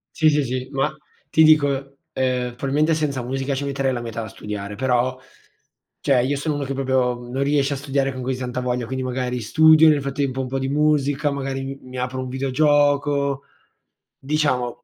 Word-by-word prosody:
Sì, 155 Hz, -1 st, +4 dB
sì, 150 Hz, -1 st, +2 dB
sì, 130 Hz, 0 st, -3 dB
ma 135 Hz, -1 st, +1 dB, 0.4 s
ti 160 Hz, -, +5 dB
dico, 140 Hz, -3 st, +3 dB, 0.2 s
ehm, 125 Hz, -2 st, -1 dB
probabilmente 145 Hz, +5 st, +1 dB
senza 145 Hz, -5 st, -1 dB
musica 135 Hz, +2 st, -2 dB
ci 140 Hz, +1 st, -3 dB
metterei 135 Hz, -1 st, -1 dB
la 120 Hz, -, -3 dB
metà 115 Hz, -1 st, -5 dB
a -, -, -6 dB
studiare, 105 Hz, -1 st, -6 dB
però 130 Hz, +1 st, 0 dB, 0.8 s
cioè 130 Hz, -3 st, +2 dB
io 140 Hz, +3 st, 0 dB
sono 150 Hz, +1 st, -2 dB
uno 145 Hz, -, -2 dB
che 135 Hz, -, -3 dB
proprio 130 Hz, -2 st, +1 dB
non 135 Hz, +2 st, -1 dB
riesce 140 Hz, 0 st, +1 dB
a -, -, -2 dB
studiare 135 Hz, 0 st, -1 dB
con 130 Hz, -, -6 dB
così 130 Hz, 0 st, -2 dB
tanta 125 Hz, 0 st, -3 dB
voglia, 125 Hz, -1 st, -1 dB
quindi 130 Hz, +1 st, -3 dB
magari 125 Hz, -1 st, -2 dB
studio, 160 Hz, +7 st, +6 dB
nel 150 Hz, -2 st, +3 dB
frattempo 135 Hz, -1 st, -2 dB
un 130 Hz, -, -4 dB
po' 135 Hz, +1 st, -2 dB
di 135 Hz, 0 st, -2 dB
musica, 145 Hz, 0 st, +1 dB
magari 135 Hz, -1 st, -3 dB, 0.2 s
m -, -, -16 dB
mi 130 Hz, 0 st, -8 dB
apro 125 Hz, +1 st, -3 dB
un 130 Hz, -, -5 dB
videogioco, 140 Hz, +1 st, +1 dB, 0.7 s
diciamo 130 Hz, -4 st, -1 dB
135 Hz, 190 wpm, -22 LUFS, 125-145 Hz, 0.8 s, studio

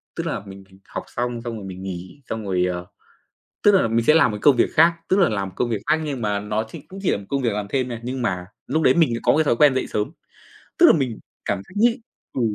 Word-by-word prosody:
tức -, -, -3 dB
là, -, -, -2 dB
mình 95 Hz, 0 st, -11 dB
mình 95 Hz, 0 st, -19 dB
học -, -, -5 dB
xong, 120 Hz, -1 st, -3 dB
xong 115 Hz, -1 st, -5 dB
rồi 100 Hz, -, -8 dB
mình 95 Hz, 0 st, -8 dB
nghỉ 95 Hz, +7 st, -7 dB
xong 110 Hz, -1 st, -4 dB
rồi, 90 Hz, -2 st, +1 dB
ờ, 90 Hz, -1 st, -3 dB, 0.8 s
tức 205 Hz, -, +6 dB
là, 185 Hz, -12 st, +4 dB
mình 115 Hz, +1 st, +1 dB
sẽ 155 Hz, -, +6 dB
làm 160 Hz, -6 st, +5 dB
một 105 Hz, -, -4 dB
cái -, -, -9 dB
công 145 Hz, -3 st, +6 dB
việc 120 Hz, -, +2 dB
khác, 165 Hz, +2 st, +6 dB
tức 190 Hz, -, +3 dB
là, 190 Hz, -, +5 dB
làm 100 Hz, -3 st, -2 dB
một 95 Hz, -, -14 dB
công 120 Hz, -, 0 dB
việc 110 Hz, -3 st, -2 dB
khác 155 Hz, +1 st, +2 dB
nhưng 140 Hz, -5 st, -4 dB
mà 105 Hz, -1 st, 0 dB
nó 105 Hz, +1 st, -2 dB
chỉ -, -, -9 dB
cũng 190 Hz, -, -10 dB
chỉ 185 Hz, -, +2 dB
là -, -, 0 dB
một 100 Hz, -, -10 dB
công 140 Hz, -1 st, -1 dB
việc 120 Hz, -, +2 dB
làm 105 Hz, 0 st, -3 dB
thêm 130 Hz, 0 st, 0 dB
thôi, 120 Hz, -2 st, -5 dB
nhưng 125 Hz, +1 st, -4 dB
mà 90 Hz, -6 st, -2 dB, 0.2 s
lúc 160 Hz, +3 st, 0 dB
đấy 130 Hz, -, +5 dB
mình 160 Hz, -9 st, +3 dB
lại 115 Hz, -, -3 dB
có -, -, +4 dB
một -, -, +2 dB
cái 160 Hz, -, +3 dB
thói 130 Hz, -, +2 dB
quen 145 Hz, +1 st, +5 dB
dậy 130 Hz, -, -1 dB
sớm. 105 Hz, +4 st, -2 dB, 0.7 s
Tức 350 Hz, -, +8 dB
là, -, -, +8 dB
mình 125 Hz, -5 st, -2 dB, 0.3 s
cảm 100 Hz, -, -1 dB
thấy -, -, -15 dB
nhị 230 Hz, +3 st, +3 dB, 0.3 s
ừ. -, -, -2 dB
120 Hz, 300 wpm, -22 LUFS, 100-145 Hz, 0.8 s, Tức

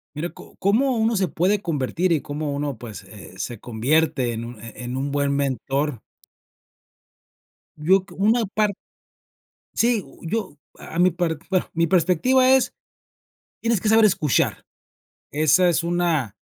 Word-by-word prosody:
Mira, 170 Hz, +4 st, -3 dB
¿có -, -, -15 dB
cómo 240 Hz, +6 st, +2 dB
uno 225 Hz, 0 st, +2 dB
se 190 Hz, -2 st, +1 dB
puede 190 Hz, +6 st, +1 dB
convertir 165 Hz, +2 st, -1 dB
y 160 Hz, -4 st, +2 dB
cómo 145 Hz, 0 st, -4 dB
uno, 140 Hz, -2 st, -3 dB
pues, 110 Hz, -3 st, -9 dB
eh, 95 Hz, -3 st, -13 dB
se 115 Hz, +4 st, -5 dB
convierte 125 Hz, +2 st, 0 dB
en 115 Hz, +1 st, -5 dB
un 120 Hz, -1 st, -9 dB
eh 115 Hz, -, -8 dB
eh -, -, -8 dB
en 125 Hz, +2 st, -4 dB
un 140 Hz, +1 st, -2 dB
buen 140 Hz, 0 st, 0 dB
mentor? 140 Hz, -1 st, -1 dB, 1.8 s
Yo 185 Hz, +5 st, +3 dB
cre -, -, -15 dB
una 225 Hz, +4 st, +3 dB
par 210 Hz, +1 st, 0 dB, 1.0 s
sí, 235 Hz, -3 st, +2 dB
u -, -, -18 dB
yo 185 Hz, -4 st, -3 dB, 0.2 s
a 165 Hz, -, -6 dB
mi 180 Hz, +1 st, +5 dB
par 170 Hz, -1 st, -1 dB
bueno, 185 Hz, -2 st, 0 dB
mi 165 Hz, 0 st, +1 dB
perspectiva 185 Hz, -, +3 dB
es, 265 Hz, -1 st, +3 dB, 0.9 s
tienes 230 Hz, -4 st, +1 dB
que 215 Hz, -, -1 dB
saber 220 Hz, +1 st, +6 dB
escuchar. 155 Hz, -9 st, +1 dB, 0.7 s
Esa 155 Hz, +5 st, +4 dB
es 170 Hz, -1 st, +2 dB
una 170 Hz, -, 0 dB
160 Hz, 155 wpm, -23 LUFS, 140-195 Hz, 1.8 s, saber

